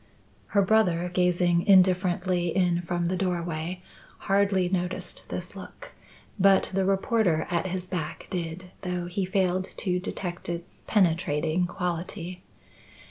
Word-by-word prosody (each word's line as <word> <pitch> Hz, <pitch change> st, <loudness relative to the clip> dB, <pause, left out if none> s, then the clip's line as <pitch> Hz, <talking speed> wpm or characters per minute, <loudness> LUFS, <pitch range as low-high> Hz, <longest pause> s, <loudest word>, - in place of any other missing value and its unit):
Her 200 Hz, -, +6 dB
brother, 180 Hz, -4 st, +2 dB
gazing 180 Hz, 0 st, +2 dB
indifferently 185 Hz, -2 st, +4 dB
in 175 Hz, 0 st, +1 dB
from 175 Hz, 0 st, -2 dB
the 180 Hz, +2 st, 0 dB
doorway, 175 Hz, -1 st, -2 dB, 0.4 s
hardly 195 Hz, -2 st, +2 dB
noticed 180 Hz, 0 st, -3 dB
this -, -, -6 dB
look; -, -, -10 dB, 0.5 s
but 195 Hz, 0 st, +4 dB
the 190 Hz, 0 st, +1 dB
reporter 195 Hz, -3 st, +2 dB
at 170 Hz, +1 st, 0 dB
his 185 Hz, 0 st, -3 dB
back 180 Hz, -5 st, -4 dB
did, 180 Hz, 0 st, -4 dB
though 180 Hz, -2 st, -3 dB
he 185 Hz, +2 st, -2 dB
failed 185 Hz, 0 st, +1 dB
to 180 Hz, -2 st, 0 dB
detect 180 Hz, -2 st, -5 dB
its 170 Hz, 0 st, -6 dB
penetrating 165 Hz, -3 st, +2 dB
quality. 175 Hz, 0 st, -4 dB
180 Hz, 125 wpm, -27 LUFS, 175-185 Hz, 0.5 s, Her